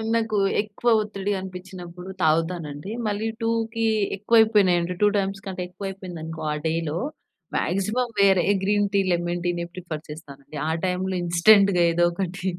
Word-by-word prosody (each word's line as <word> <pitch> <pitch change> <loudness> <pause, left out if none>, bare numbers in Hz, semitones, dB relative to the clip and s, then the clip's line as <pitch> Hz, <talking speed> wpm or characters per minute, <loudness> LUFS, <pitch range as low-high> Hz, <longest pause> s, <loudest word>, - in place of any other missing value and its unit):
నాకు 220 -2 0 0.2
ఎక్కువ 215 +3 -2
ఒత్తిడి 205 -1 -3
అనిపించినప్పుడు 180 -1 -9
తాగుతానండి. 160 +1 0 0.2
మళ్ళీ 210 +1 -1
2కి 230 0 0 0.3
ఎక్కువైపోనయంటే, 200 -5 +3
2 210 - +6
టైమ్స్ 195 -1 -1
కంటే 190 -2 -5
ఎక్కువ 195 +2 -7
అయిపోయిందనుకో, 170 -4 -7
ఆ - - 0
డేలో, 160 0 -1 0.6
మాక్సిమం 210 +7 0
వేరే 195 -3 +5 0.2
గ్రీన్‌ 205 +1 +2
టీ, 200 - +4
లెమన్‌ 175 0 -1
టీనే 175 -1 -1
ప్రిఫర్ 170 -4 -6
చేస్తానండి. 150 -1 -10
ఆ - - +1 0.2
టైమ్‌లో 185 +1 -1
ఇన్స్టాంట్‌గా 180 +2 +5
ఏదో 175 +1 +2
ఒకటి 180 +1 -4
185 Hz, 135 wpm, -24 LUFS, 170-205 Hz, 0.6 s, 2